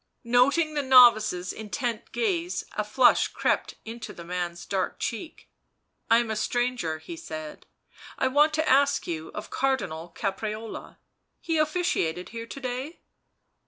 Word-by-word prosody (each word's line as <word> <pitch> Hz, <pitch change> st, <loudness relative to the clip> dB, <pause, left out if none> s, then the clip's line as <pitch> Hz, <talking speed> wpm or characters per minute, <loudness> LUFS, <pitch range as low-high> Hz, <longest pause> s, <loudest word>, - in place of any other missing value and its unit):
Noting 275 Hz, +7 st, +3 dB
the 295 Hz, -, 0 dB
novice's 235 Hz, -9 st, +5 dB
intent 220 Hz, +2 st, -4 dB
gaze, 360 Hz, -6 st, -1 dB
a -, -, -1 dB
flush -, -, +4 dB
crept -, -, -1 dB
into 230 Hz, +1 st, -7 dB
the 170 Hz, -, -10 dB
man's 175 Hz, 0 st, -4 dB
dark 190 Hz, -2 st, -2 dB
cheek. 235 Hz, +8 st, -5 dB, 0.6 s
il 230 Hz, -, +7 dB
I -, -, +5 dB
am 230 Hz, -2 st, -4 dB
a -, -, -1 dB
stranger," 240 Hz, -7 st, -1 dB
he 160 Hz, +2 st, -9 dB
said. 155 Hz, -1 st, -8 dB, 0.3 s
" -, -, -18 dB
I 260 Hz, -, +2 dB
want 295 Hz, +4 st, +4 dB
to 315 Hz, 0 st, 0 dB
ask 280 Hz, +1 st, +3 dB
you 160 Hz, -2 st, -4 dB
of 210 Hz, -, -7 dB
Cardinal 180 Hz, -12 st, -1 dB
Caprarola. 215 Hz, +2 st, -4 dB, 0.4 s
He 325 Hz, -2 st, -1 dB
officiated 305 Hz, -, 0 dB
here 230 Hz, 0 st, -7 dB
to 275 Hz, -, -8 dB
day?" 260 Hz, +5 st, -5 dB
235 Hz, 150 wpm, -26 LUFS, 180-275 Hz, 0.6 s, il